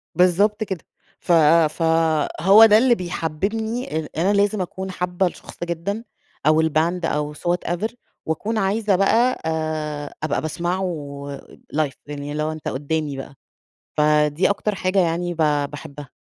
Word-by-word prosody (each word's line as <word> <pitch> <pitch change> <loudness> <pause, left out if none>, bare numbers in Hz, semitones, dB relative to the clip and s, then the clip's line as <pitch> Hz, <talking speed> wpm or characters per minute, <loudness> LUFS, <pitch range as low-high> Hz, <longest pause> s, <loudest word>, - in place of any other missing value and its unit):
بالضبط 200 +5 +3
كده 190 -5 -5 0.4
ف - - -3 0.4
فهو 165 +5 +4
ده 215 -1 +6
اللي 240 +1 +4
بيحببني 200 - -3
ال 155 - -8
أنا 185 +5 +2
لازم 205 0 +2
أكون 190 +1 -5
حابة 180 +1 0
الشخص 175 - -9
جدًا، 175 +6 -3 0.4
أو 155 +1 +5
الباند، 160 +3 +1
أو 150 -1 -1
so - - -13
whatever، 175 +4 -1 0.3
وأكون 205 +8 -2
عايزة 205 0 +1
بقى 230 +7 +2
آآ 155 -2 -3
أبقى 155 - 0
باسمعه 175 +4 -2 0.9
لايف 150 -3 0
يعني 145 0 -6
اللي 150 +1 -2
هو 155 - -1
أنت 155 -1 -7
قدامي 145 +1 -2
بقى، 135 +1 -8 0.6
فدي 150 +3 +3
أكتر 205 0 -1
حاجة 185 +1 +1
يعني 175 0 0
ب - - -15 0.3
باحبها. 145 -1 -9
170 Hz, 140 wpm, -22 LUFS, 155-195 Hz, 0.9 s, ده